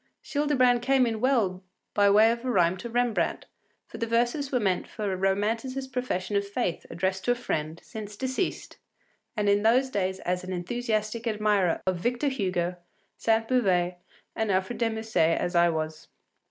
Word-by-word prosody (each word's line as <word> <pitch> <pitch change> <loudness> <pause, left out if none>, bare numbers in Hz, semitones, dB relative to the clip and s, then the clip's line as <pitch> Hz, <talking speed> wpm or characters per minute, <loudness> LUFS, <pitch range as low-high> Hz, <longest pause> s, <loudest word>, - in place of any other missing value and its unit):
” - - -55
Childebrand 265 -5 +2
came 265 0 +3
in 225 -2 -2
well 220 -9 +1 0.3
by 205 -1 +4
way 215 +3 +6
of 235 +1 -4
a 260 - -2
rime 180 -6 +3
to 235 +6 -7
Rembrandt, 240 -1 0 0.4
for - - -10
the 230 - -1
verses 240 +5 0
were 250 - +2
meant 190 -5 0
for 205 -3 -3
a - - -1
Romanticist 225 +8 -1
profession 210 -6 -2
of 200 0 +1
faith 200 -4 -2
addressed 190 +1 -2
to 245 - +3
a - - -5
friend, 160 -9 -3
since 210 -1 -8
deceased, 260 - -3 0.6
and 210 -1 +1
in 200 0 +4
those 250 +5 +3
days 190 -3 -1
as 180 +1 -2
enthusiastic 215 +4 -2
an 220 - 0
admirer 205 -5 +1
of 185 -1 +1
Victor 245 - 0
Hugo, 180 -8 -1 0.4
Sainte 225 0 +1
Beuve, 185 -8 +2 0.4
and 220 -2 0
Alfred 190 +5 -1
de 230 -1 +2
Musset 220 -7 +1
as 175 - -2
I 170 0 +5
was. 155 -1 -4
215 Hz, 180 wpm, -27 LUFS, 185-245 Hz, 0.6 s, way